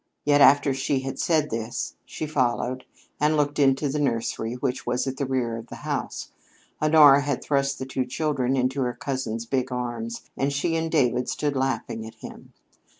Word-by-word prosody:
Yet 145 0 +4
after 140 0 +6
she 135 0 0
had 135 0 -5
said 155 -3 +1
this, 115 +1 -3
she - - -5
followed, 130 -3 -1 0.3
and 150 +1 +2
looked 145 0 0
into 135 +1 +3
the 145 +2 -2
nursery, 115 -3 -1
which 125 0 -2
was 120 +1 -1
at 135 -1 -4
the 140 - -2
rear 125 -3 -1
of 115 +1 -9
the - - -9
house. - - -3 0.5
Honora 150 -2 +7
had 145 -2 -2
thrust 140 -1 0
the 130 - -5
two 130 -1 -2
children 135 -1 -1
into 130 +2 0
her 125 -1 -1
cousin's 125 -4 -3
big 130 +1 -1
arms 125 - -4
and 135 +1 0
she 165 +4 0
and 165 0 -1
David 125 -5 +2
stood 145 -2 -1
laughing 130 -4 -2
at 115 - -12
him. 110 - -11
135 Hz, 185 wpm, -25 LUFS, 125-145 Hz, 0.5 s, Honora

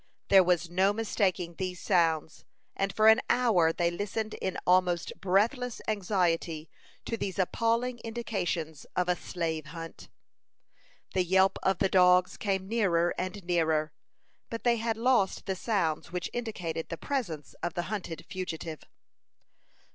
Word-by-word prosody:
There 195 -1 +8
was 175 -1 +1
no 190 +4 +2
mistaking 195 -5 0
these 185 -2 -3
sounds; 165 -4 +1 0.3
and 195 0 0
for 215 +3 +3
an 220 +2 +7
hour 220 -10 +4
they 170 +1 0
listened 210 +4 -3
in 190 - -2
almost 180 -1 +2
breathless 225 +6 +1
anxiety 175 -6 0 0.3
to 230 - -2
these 190 -4 -4
appalling 230 +5 0
indications 185 -10 -3
of 180 -1 +1
a 180 - +2
slave 160 -3 -3
hunt. 165 +1 -9 1.0
The 185 - +2
yelp 190 +2 +3
of 190 -1 +2
the 195 - +2
dogs 180 -1 +4
came 190 -2 -2
nearer 185 -6 +2
and 185 +2 -4
nearer; 160 -3 +1 0.6
but 230 - -5
they 240 -1 +3
had 225 0 -1
lost 235 -5 +2
the 190 - -1
sounds 185 -8 -1
which 180 -1 -3
indicated 180 -9 -4
the 165 - -4
presence 175 - -3
of 170 - -3
the 175 - -1
hunted 180 -4 -5
fugitive. 165 -4 -5
185 Hz, 140 wpm, -29 LUFS, 170-215 Hz, 1.0 s, There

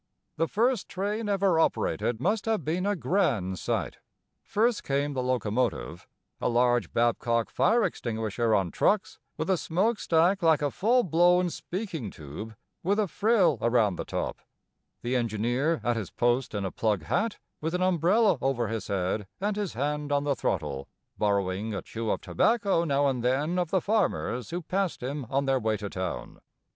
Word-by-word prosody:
The 165 +1 +1
first 235 +1 +1
train 205 +3 -2
ever 195 -4 +2
operated 120 -7 0
must 200 - 0
have 220 -8 0
been 175 +5 0
a 205 - +1
grand 120 - 0
sight. - - -2 0.4
First 225 +2 +1
came 140 +1 0
the 130 - -1
locomotive, 125 -2 -1 0.3
a - - 0
large 120 -4 +2
Babcock 115 0 +1
fire 230 +2 +3
extinguisher 115 -1 -1
on 95 -4 0
trucks, 205 -2 +1 0.2
with 160 0 -2
a 190 - +2
smoke 200 +9 0
stack 175 +4 +3
like 160 -3 +3
a 145 - +1
full 245 +5 +3
blown 175 +1 +3
speaking 175 - -5
tube 85 +10 -9 0.3
with 200 +4 +1
a 215 -2 +2
frill 190 - +2
around 115 -5 +3
the - - -3
top; - - -3 0.6
the 120 +2 -1
engineer 120 +7 0
at 120 -1 +1
his 105 -6 -4
post 120 -1 0
in 100 -1 -2
a 95 - -3
plug 105 -6 0
hat, 205 - 0 0.2
with 160 +3 -1
an 180 - +1
umbrella 185 - +3
over 120 -5 0
his 110 -3 -4
head 95 +1 -1
and 205 +2 -1
his 205 -3 -3
hand 145 +4 -2
on 140 0 +2
the 145 -1 +1
throttle, 70 - -2 0.3
borrowing 100 +1 0
a - - -4
chew 115 -1 -4
of - - 0
tobacco 205 -7 +2
now 145 -3 +2
and 130 -4 0
then 145 +8 +1
of 175 -2 -1
the 190 - +2
farmers 195 - 0
who 175 +1 -4
passed 185 -4 -2
him 135 +1 -3
on 140 +1 +1
their 135 -1 +2
way 110 -1 0
to 105 -2 -6
town. 95 -1 -5
145 Hz, 175 wpm, -28 LUFS, 115-185 Hz, 0.6 s, fire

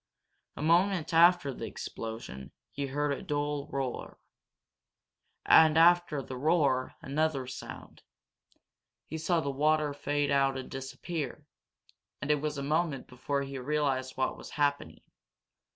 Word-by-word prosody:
A - - -5
moment 170 +1 +2
after 170 -4 +5
the - - -6
explosion, 110 - -7 0.2
he 140 0 -3
heard 145 +2 -1
a - - -5
dull 145 -1 -2
roar. 135 -2 -4 1.3
And 160 -1 +7
after 170 -3 +4
the 130 - -7
roar 140 -3 +1
another 145 -1 0
sound. 130 - -9 1.0
He 160 - -6
saw 165 +1 +1
the 140 - -2
water 150 +1 +2
fade 145 0 -1
out 135 -1 +2
and 130 - -7
disappear, 135 +2 -5 0.7
and 145 - -1
it 150 -1 +2
was 150 -1 -2
a 140 - -3
moment 150 -2 0
before 140 +3 -3
he 135 -1 -6
realized 135 -1 -1
what 130 - 0
was - - -10
happening. 145 -1 -1
145 Hz, 135 wpm, -30 LUFS, 135-155 Hz, 1.3 s, And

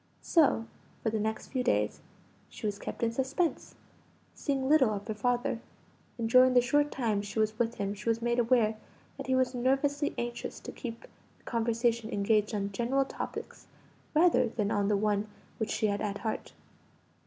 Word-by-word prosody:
So 290 -8 +3 0.4
for 220 - +1
the 220 - -1
next 220 +1 -2
few 255 -2 -1
days 105 - +1 0.5
she - - -8
was 205 -1 -2
kept - - -5
in 230 - +2
suspense, 265 +7 -1 0.6
seeing 270 -2 -1
little 285 -5 +5
of 205 -1 -4
her 220 - -1
father; 240 +2 0 0.6
and 230 -1 -1
during 255 +2 +6
the - - +9
short 290 +4 +2
times 215 -5 -1
she 205 - -7
was 215 +1 +1
with 235 0 +1
him 200 -2 -2
she 210 +3 -4
was 230 0 +2
made 235 +1 0
aware 230 -2 +3 0.4
that 275 - -6
he 260 - +2
was 255 0 +2
nervously 275 +4 +1
anxious 240 0 -4
to - - -7
keep 235 -3 -7 0.3
the - - -30
conversation 230 -1 0
engaged 210 +1 +1
on 200 -1 -2
general 250 +6 +1
topics - - -7 0.5
rather 340 +3 +5
than 215 -2 -1
on 200 -1 +1
the 205 -1 +3
one 210 0 +1 0.3
which 220 - -1
she - - 0
had 205 -1 0
at 205 -1 -2
heart. 220 0 -4
230 Hz, 180 wpm, -30 LUFS, 215-255 Hz, 0.6 s, the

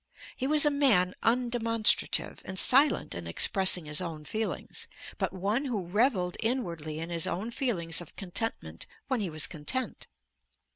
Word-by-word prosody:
He 260 - -3
was 300 +1 +6
a 295 - +3
man 225 -11 +3
undemonstrative, 230 -2 +1
and 190 0 -8
silent 275 +8 +6
in 85 -1 -7
expressing 185 - +3
his 150 +3 -3
own 160 -4 -7
feelings, 220 +5 -4 0.3
but - - -2
one 205 +9 -2
who 220 -9 -4
revelled 190 -2 0
inwardly 170 - -3
in 165 +2 -6
his 165 -1 +1
own 215 +6 -4
feelings 175 - -2
of 175 - -14
contentment 180 - -4 0.2
when 260 -4 -1
he 195 - -3
was 155 -2 -1
content. 180 - -4
195 Hz, 150 wpm, -28 LUFS, 170-245 Hz, 0.3 s, was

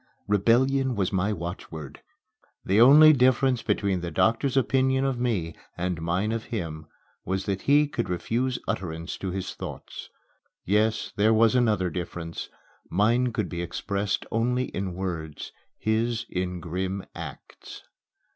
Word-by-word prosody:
Rebellion 125 +6 +3
was 100 -3 -1
my 95 +2 +1
watchword. 85 -5 -6 0.6
The 100 +4 +4
only 150 +5 +9
difference 130 -1 +3
between 95 -3 0
the 85 - -3
doctor's 115 - +1
opinion 130 0 +2
of 135 -3 -1
me 100 -10 -1 0.2
and 90 -2 -2
mine 90 +6 0
of 115 -1 -3
him 80 - -5 0.4
was 95 +1 -2
that 100 -2 -2
he 145 +1 +4
could 120 -5 -3
refuse 120 +8 -1
utterance 85 -2 -3
to 95 - -3
his 95 0 -4
thoughts. - - -8 0.6
Yes 105 +3 +1
there 110 +2 +4
was 115 +1 +4
another 105 -8 +2
difference. 85 -2 -5 0.4
Mine 120 +7 +2
could - - -2
be 85 -1 -4
expressed 100 +3 -2
only 125 +3 0
in 95 -2 -4
words 85 -5 -5 0.3
his 115 +1 0
in 90 -1 -2
grim 95 +3 -3
acts. - - -10
105 Hz, 135 wpm, -26 LUFS, 90-120 Hz, 0.6 s, only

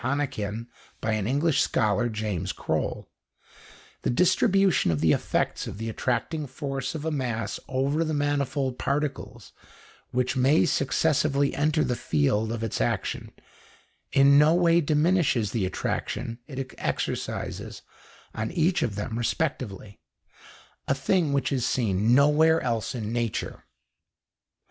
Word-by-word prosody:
Hannequin, 115 -5 -2 0.3
by 110 - -1
an 110 -2 -1
English 145 +4 +2
scholar, 110 +3 +1
James 105 -5 -3
Croll) - - -2 0.9
the - - -1
distribution 185 - +3
of 80 -3 +1
the 80 0 +3
effects - - -1
of 100 - -7
the 115 +1 -4
attracting 130 +7 -2
force 135 +2 -4
of 155 0 -5
a 160 - 0
mass 115 -7 -2
over 140 +5 0
the 155 - -2
manifold 140 -2 -1
particles 145 +1 -3 0.6
which 125 +1 0
may 135 +6 +4
successively 140 -1 +1
enter 155 +2 +1
the 125 - 0
field 105 +7 0
of 115 -1 -3
its 110 - -2
action - - -2 0.8
in 140 +1 +6
no 155 +3 +5
way 170 -1 +4
diminishes 150 - +2
the 105 -6 0
attraction 115 +5 -3
it 135 -3 -6
exercises - - -3 0.5
on 110 0 -3
each 175 +1 +1
of 105 - -1
them 110 +3 -3
respectively, 120 -7 -3 0.9
a 135 - +2
thing 160 +2 +1
which 140 -1 0
is 130 -3 0
seen 110 -2 +2
nowhere 150 +3 +5
else 115 +1 -2
in 110 -2 -4
nature. 120 -2 -3
130 Hz, 130 wpm, -26 LUFS, 115-150 Hz, 0.9 s, in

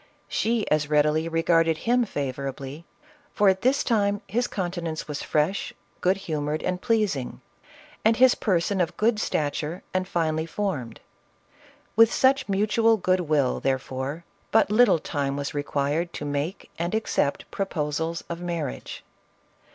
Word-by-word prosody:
She 225 -1 0
as 150 -1 +2
readily 150 +2 +2
regarded 165 -1 +2
him 245 +1 +3
favorably, 140 - -5 0.5
for 205 -3 +5
at 190 0 +1
this 265 +3 +2
time 205 -3 +1
his 240 +2 0
countenance 175 -4 -4
was 150 -2 -4
fresh, 155 +6 0 0.2
good 185 +2 +2
humored 155 -4 -3
and 180 0 -2
pleasing, 210 - 0 0.6
and 220 +1 +4
his 255 0 +6
person 190 -1 0
of 170 0 -2
good 220 0 +2
stature 150 0 -2
and 185 0 0
finely 160 -2 -1
formed. 155 - -3 0.9
With 225 +1 +6
such 265 -3 +3
mutual 215 +3 +3
good 185 -1 +2
will, 150 -6 +1
therefore, 135 +4 -2 0.2
but 220 -2 +3
little 215 -4 +5
time 140 -2 -2
was 140 0 -3
required 145 +3 -1
to 145 - -5
make 145 +6 -3
and 170 +5 -1
accept 185 -9 -1
proposals 165 -3 -2
of 170 0 -5
marriage. 170 -6 -4
170 Hz, 135 wpm, -25 LUFS, 150-205 Hz, 0.9 s, his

